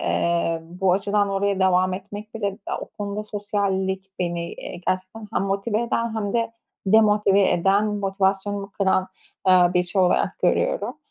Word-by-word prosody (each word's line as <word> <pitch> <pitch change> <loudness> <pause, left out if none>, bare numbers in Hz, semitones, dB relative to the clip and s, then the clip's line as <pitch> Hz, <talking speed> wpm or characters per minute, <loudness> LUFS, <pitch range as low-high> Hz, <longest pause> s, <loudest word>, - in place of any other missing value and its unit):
eee, 170 -1 0
bu 180 +2 0
açıdan 200 +1 +1
oraya 195 0 0
devam 185 0 +3
etmek 205 +3 -8
bile 215 -3 -2 0.2
ya, - - -2
o - - -4
konuda 205 +1 -3
sosyallik 195 -2 -2
beni, 170 -1 -2
eee, - - -8
gerçekten 185 +4 -2
hem - - +1
motive 200 +3 -1
eden 230 -1 -1
hem 205 -2 -2
de 230 -1 0 0.3
demotive 210 -2 +4
eden, 195 +4 +3
motivasyonumu 195 0 -1
kıran, 190 -1 +1 0.4
aaa, 180 -1 +5
bir 180 - +4
şey 185 +1 0
olarak 180 - +1
görüyorum. - - 0
195 Hz, 150 wpm, -23 LUFS, 185-210 Hz, 0.4 s, aaa